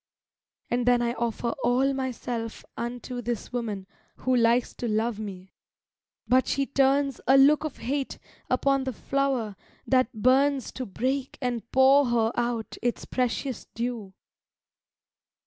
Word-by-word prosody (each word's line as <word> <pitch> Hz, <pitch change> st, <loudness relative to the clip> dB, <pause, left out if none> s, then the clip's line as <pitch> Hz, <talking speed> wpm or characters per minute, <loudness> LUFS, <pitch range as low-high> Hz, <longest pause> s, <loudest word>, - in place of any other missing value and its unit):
And 245 Hz, 0 st, 0 dB
then 245 Hz, -1 st, +4 dB
I 235 Hz, 0 st, 0 dB
offer 235 Hz, 0 st, -2 dB
all 255 Hz, +3 st, +3 dB
myself 245 Hz, -3 st, -4 dB
unto 245 Hz, +1 st, -5 dB
This 240 Hz, 0 st, -4 dB
woman 215 Hz, -6 st, -3 dB, 0.3 s
who 255 Hz, 0 st, 0 dB
likes 235 Hz, 0 st, +3 dB
to 240 Hz, -, -3 dB
love 220 Hz, 0 st, 0 dB
me: 190 Hz, -3 st, -8 dB, 0.7 s
but 255 Hz, +3 st, +4 dB
she 275 Hz, 0 st, +1 dB
turns 275 Hz, 0 st, +2 dB
A 265 Hz, +2 st, +7 dB
look 290 Hz, +3 st, +6 dB
of 310 Hz, -3 st, -4 dB
hate 270 Hz, +4 st, -3 dB, 0.3 s
upon 270 Hz, +1 st, +2 dB
the 260 Hz, -, -2 dB
flower 265 Hz, -5 st, -1 dB, 0.3 s
that 255 Hz, -2 st, +2 dB
burns 265 Hz, +3 st, +2 dB
To 255 Hz, -, -5 dB
break 260 Hz, +6 st, -2 dB
and 240 Hz, -3 st, -3 dB
pour 270 Hz, +1 st, +6 dB
her 230 Hz, -2 st, +2 dB
out 235 Hz, -2 st, -2 dB
its 240 Hz, 0 st, -1 dB
precious 255 Hz, 0 st, -2 dB
dew. 230 Hz, -5 st, -4 dB
245 Hz, 135 wpm, -27 LUFS, 230-265 Hz, 0.7 s, A